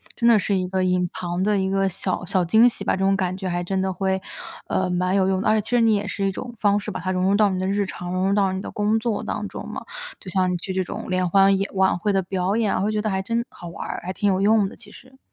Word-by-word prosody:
真 235 - +1
的 230 -2 +6
是 200 +1 0
一 185 0 -1
个 185 0 -1
隐 180 -1 +1
藏 175 0 -3
的 205 -1 +2
一 190 0 0
个 195 0 +1
小 190 0 -3
小 185 0 +1
惊 220 +8 +5
喜 210 -4 -1
吧， - - +1
这 - - -6
种 195 - +3
感 185 -1 -1
觉 190 -1 -4
还 175 0 -1
真 190 +2 -1
的 190 0 -1
会， 190 0 0 0.5
呃， 185 -1 0
蛮 180 +1 0
有 190 -1 +3
用 190 -1 +1
的。 - - 0
而 215 0 +4
且 - - +1
其 215 - -9
实 245 -1 +3
你 225 -1 +4
也 205 0 -1
是 200 0 -2
一 195 - +1
种 240 +4 -7
方 205 -1 +2
式 205 - -6
把 185 - -4
它 185 +2 -2
融 185 0 0
入 195 +1 +3
到 210 -1 +4
你 185 -1 -2
的 185 - -1
日 200 0 +1
常， 180 -1 -6
融 185 +1 0
入 - - +2
到 195 -2 +2
你 190 - -3
的 - - -6
工 210 +1 +1
作 220 -2 -2
当 - - -3
中 - - -7
嘛， - - -6 0.4
就 - - -16
像 185 -1 +1
你 180 - -1
去 190 +2 -5
这 190 0 0
种 - - -7
联 185 -1 +1
欢 195 +1 +4
演 195 - -2
晚 190 -1 +3
会 205 +3 0
的 195 -1 +1
表 185 +2 -1
演， 220 -4 +1
会 210 - 0
觉 215 - -1
得 215 -1 -1
还 190 0 0
真 230 +4 -1
好 175 - -10
玩 170 - -7
儿， - - -4
还 185 - -3
挺 205 - -1
有 185 - 0
用 210 0 +4
的 - - -10
其 - - -14
实。 260 +1 -16
195 Hz, 340 characters per minute, -23 LUFS, 185-205 Hz, 0.5 s, 的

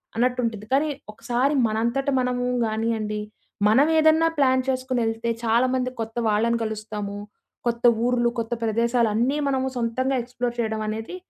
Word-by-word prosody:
అన్నట్టు 250 +2 +1
ఉంటుంది. 220 -3 -3
కానీ 285 +3 +2 0.2
ఒకసారి 245 +6 0
మనంతట 235 +5 -1
మనము 250 -1 -1 0.2
గానియ్యండి, 220 -1 -1 0.5
మనవేదన్నా 315 +7 +4
ప్లాన్ 260 -2 +3
చేసుకొని 255 -1 -1
వెళ్తే 225 +1 -2
చాలామంది 255 +3 +2
కొత్త 225 +1 -6
వాళ్ళని 225 +2 +2
కలుస్తాము. 215 -2 -5 0.5
కొత్త 235 0 -1 0.2
ఊర్లు, 245 -1 +2
కొత్త 230 +1 -2
ప్రదేశాలు 230 +1 +2
అన్నీ 245 +7 +1
మనము 265 -1 0
సొంతంగా 250 +3 0
ఎక్స్‌ప్లోర్ 245 0 -4
చేయడం 220 -1 -1
అనేది 220 +9 -4
235 Hz, 135 wpm, -24 LUFS, 225-255 Hz, 0.5 s, మనవేదన్నా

